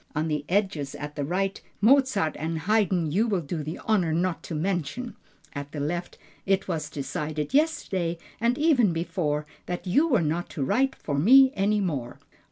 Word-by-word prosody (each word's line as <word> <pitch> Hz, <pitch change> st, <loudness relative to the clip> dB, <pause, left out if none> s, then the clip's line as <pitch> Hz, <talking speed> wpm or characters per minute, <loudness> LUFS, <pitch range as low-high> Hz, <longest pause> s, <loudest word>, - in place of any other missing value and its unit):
On 155 Hz, +2 st, 0 dB
the 150 Hz, -1 st, -1 dB
edges 180 Hz, -8 st, 0 dB
at 145 Hz, 0 st, -7 dB
the 145 Hz, -, -2 dB
right: 190 Hz, +6 st, -1 dB, 0.2 s
"Mozart 235 Hz, -, +3 dB
and 160 Hz, +1 st, -2 dB
Haydn 185 Hz, -4 st, +1 dB
you 215 Hz, +8 st, +2 dB
will 195 Hz, -5 st, 0 dB
do 155 Hz, +1 st, -4 dB
the 155 Hz, +2 st, -5 dB
honor 190 Hz, -7 st, +2 dB
not 175 Hz, +2 st, 0 dB
to 165 Hz, -, -5 dB
mention"; 190 Hz, -, -2 dB, 0.4 s
at 145 Hz, -1 st, -7 dB
the 150 Hz, -, -4 dB
left: 175 Hz, +5 st, -3 dB, 0.3 s
"It 195 Hz, 0 st, +1 dB
was 155 Hz, -4 st, -3 dB
decided 150 Hz, +1 st, -4 dB
yesterday, 190 Hz, -, +1 dB, 0.2 s
and 235 Hz, +3 st, +1 dB
even 265 Hz, -, +3 dB
before, 165 Hz, -3 st, -1 dB, 0.2 s
that 180 Hz, +1 st, -4 dB
you 280 Hz, -, +3 dB
were 245 Hz, -, +3 dB
not 165 Hz, +3 st, -1 dB
to 140 Hz, -, 0 dB
write 265 Hz, -, +1 dB
for 140 Hz, -2 st, -3 dB
me 260 Hz, -, +7 dB
any 205 Hz, +2 st, +2 dB
more." 140 Hz, -10 st, -3 dB
175 Hz, 175 wpm, -26 LUFS, 155-210 Hz, 0.4 s, me